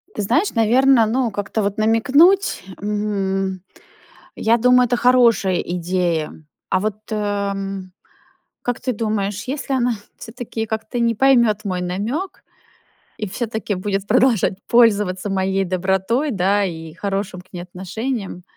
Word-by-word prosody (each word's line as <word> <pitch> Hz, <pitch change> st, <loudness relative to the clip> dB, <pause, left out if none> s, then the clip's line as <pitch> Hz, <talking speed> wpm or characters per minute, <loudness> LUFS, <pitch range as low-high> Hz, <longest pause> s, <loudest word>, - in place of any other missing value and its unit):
Ты -, -, -2 dB
знаешь, 315 Hz, -, +1 dB
наверное, 240 Hz, +1 st, +4 dB
ну, 240 Hz, +1 st, 0 dB
как-то 205 Hz, +2 st, -2 dB
вот 200 Hz, 0 st, -2 dB
намекнуть, 280 Hz, -, +3 dB, 0.2 s
м. 195 Hz, -3 st, -2 dB, 0.8 s
Я 230 Hz, +2 st, +2 dB
думаю, 250 Hz, +1 st, +5 dB
это 245 Hz, +1 st, 0 dB
хорошая 235 Hz, -7 st, +3 dB
идея. 175 Hz, -2 st, -1 dB, 0.4 s
А -, -, +1 dB
вот, 210 Hz, 0 st, -2 dB
э, 205 Hz, -2 st, -1 dB, 1.1 s
как 245 Hz, -1 st, -2 dB
ты 255 Hz, -1 st, -2 dB
думаешь, 210 Hz, -2 st, -2 dB
если 275 Hz, +1 st, -3 dB
она 245 Hz, -2 st, +1 dB, 0.2 s
все-таки 225 Hz, -1 st, -6 dB
как-то 220 Hz, +2 st, -4 dB
не 230 Hz, -1 st, +2 dB
поймет 235 Hz, -4 st, +3 dB
мой 185 Hz, -2 st, -2 dB
намек, 220 Hz, -, -3 dB, 0.7 s
и 210 Hz, -, -3 dB
все-таки 220 Hz, -1 st, -3 dB
будет 195 Hz, +1 st, -3 dB
продолжать 230 Hz, -6 st, +3 dB
пользоваться 205 Hz, -5 st, +3 dB
моей 195 Hz, 0 st, 0 dB
добротой, 190 Hz, -, 0 dB
да, 200 Hz, +1 st, +1 dB
и 160 Hz, -3 st, -6 dB
хорошим 195 Hz, -1 st, -3 dB
к 185 Hz, -, -28 dB
ней 175 Hz, -, -5 dB
отношением, 190 Hz, +2 st, -5 dB
210 Hz, 130 wpm, -20 LUFS, 190-240 Hz, 1.1 s, думаю